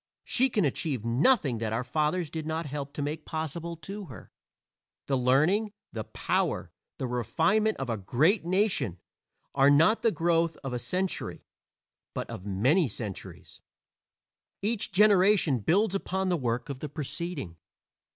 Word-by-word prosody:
She 260 +2 +3
can 210 -7 +1
achieve 135 -4 -2
nothing 130 - +2
that 110 -1 -2
our 115 +3 -1
fathers 155 +5 -1
did 160 -1 -5
not 160 +1 -2
help 140 0 -5
to 145 - -3
make 150 +2 -4
possible 165 +1 -4
to 200 +4 -7
her. 130 -8 -12 0.7
The 135 - 0
learning, 155 - +2 0.2
the - - -5
power, - - -1 0.3
the 135 - -3
refinement 165 - +1
of 135 - -4
a 115 -2 -1
great 150 - +2
nation, 175 - +1 0.6
are 135 0 +5
not 160 +10 +5
the 230 - +4
growth 165 -2 +1
of 135 -2 -4
a 125 - -2
century, 180 +10 -3 0.7
but - - -3
of 95 - -7
many 130 - +3
centuries; 105 -3 -7 1.0
each 215 0 +1
generation 190 - +4
builds 185 - +2
upon 190 -1 -1
the 180 - +2
work 120 -1 -2
of 135 -2 -5
the 150 - -5
preceding. 150 - -5
155 Hz, 150 wpm, -28 LUFS, 130-185 Hz, 1.0 s, are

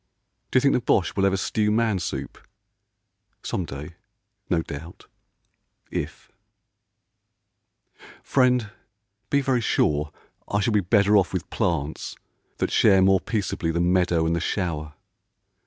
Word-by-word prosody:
D'you - - +4
think 140 +2 +3
the - - +1
Boche 90 -6 +1
will 100 0 +3
ever 95 0 +1
stew 105 +2 0
man 110 -2 +1
soup? - - -5 1.0
Some 90 - -2
day, 75 +4 -8 0.5
no 85 -2 +1
doubt, 80 +2 -9 0.9
if... 75 -3 -5 1.9
Friend, 125 -5 +2 0.6
be 140 - +2
very 130 -3 +1
sure 75 -8 +1 0.4
I 100 - 0
shall 105 +2 +1
be 105 - +4
better 100 +2 +4
off 95 -2 +1
with 90 -4 -3
plants 85 -8 -2 0.4
that - - -1
share 95 -1 +5
More 95 0 +5
peaceably 100 -6 -2
the 85 +1 0
meadow 90 -2 +2
and 85 +1 +1
the - - 0
shower. 80 -4 -3
95 Hz, 130 wpm, -24 LUFS, 80-105 Hz, 1.9 s, share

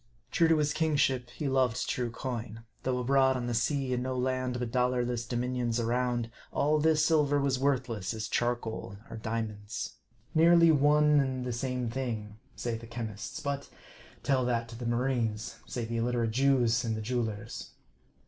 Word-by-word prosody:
True 165 - +4
to 160 -1 +4
his 150 0 +1
kingship, 140 -6 +1
he 140 +4 -4
loved 130 -3 +1
true 125 -2 -1
coin; 115 -2 -5 0.2
though 130 -1 0
abroad 130 +1 +3
on 125 - -3
the 120 - -1
sea, 130 +3 0
and 125 - 0
no 130 0 -2
land 130 0 0
but 120 -2 -3
dollarless 125 -1 0
dominions 120 -1 -1
around, 120 0 0 0.2
all 150 +2 +2
this 155 0 +3
silver 145 -3 +3
was 135 -2 +1
worthless 125 -8 0
as 110 -1 -3
charcoal 115 -3 -2
or 115 - -5
diamonds. 110 -2 -4 0.4
Nearly 170 0 +6
one 150 0 +5
and 130 -2 -1
the 125 - -2
same 125 0 -2
thing, 115 -4 -4 0.2
say 120 -2 -2
the 115 - -11
chemists; 115 -3 -5
but 140 -1 -3 0.5
tell 135 -2 +2
that 115 -1 0
to 115 - -8
the 120 0 -5
marines, 120 -3 -1
say 120 -2 -3
the 115 +1 -3
illiterate 115 -1 0
Jews 125 -2 +3
and 110 -2 -1
the - - -4
jewelers. 110 -2 -3
125 Hz, 165 wpm, -30 LUFS, 115-135 Hz, 0.5 s, Nearly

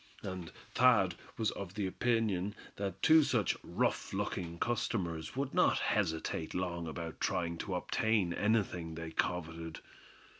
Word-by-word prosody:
And 90 -3 -5 0.2
Thad 115 -8 +5 0.2
was 110 -2 +1
of 95 -1 -7
the 105 -2 -1
opinion 105 -2 +1 0.2
that 100 -1 -4
two 160 0 +8
such 120 - +2
rough - - -1
looking 85 -2 -2
customers 85 -8 -1
would 135 0 -2
not - - +4
hesitate 80 0 0
long 85 -2 -2
about 80 +1 -6
trying 85 -2 0
to 95 -3 -2
obtain 100 -1 +1
anything 90 -6 0
they 80 0 -5
coveted. 80 -1 -2
90 Hz, 135 wpm, -34 LUFS, 85-110 Hz, 0.2 s, two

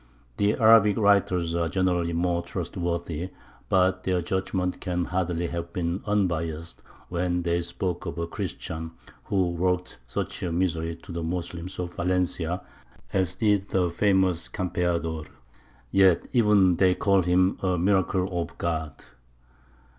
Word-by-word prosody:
The 100 +1 +2
Arabic 110 -3 +6
writers 95 -5 +3
are 85 -1 0
generally 90 -2 +1
more 85 0 +1
trustworthy, 85 0 -3 0.4
but 95 -1 +2
their 90 -1 +1
judgment 95 0 -1
can 90 -2 -1
hardly 90 -2 -1
have 85 0 -4
been 85 +1 -2
unbiassed 85 -5 -1 0.3
when 90 0 -1
they 85 0 +1
spoke 90 +1 -3
of - - -5
a 85 - -1
Christian 80 -1 -5 0.3
who 95 -3 +1
worked 90 -4 -1
such - - -4
misery 85 -2 -1
to 100 - -10
the 85 0 -3
Moslems 85 +1 -4
of 85 -1 -4
Valencia 90 -1 -1 0.5
as 95 -2 +1
did 105 -3 +1
the 90 -2 +1
famous 95 -2 +2
Campeador. 85 -4 -2 0.6
Yet 95 -3 +4
even 105 -7 +4
they 95 -1 +4
call 100 -2 +3
him 90 +1 +2
a 90 -2 +1
"miracle 95 0 +2
of - - -7
God." 80 -3 -2
90 Hz, 130 wpm, -26 LUFS, 85-95 Hz, 0.6 s, Arabic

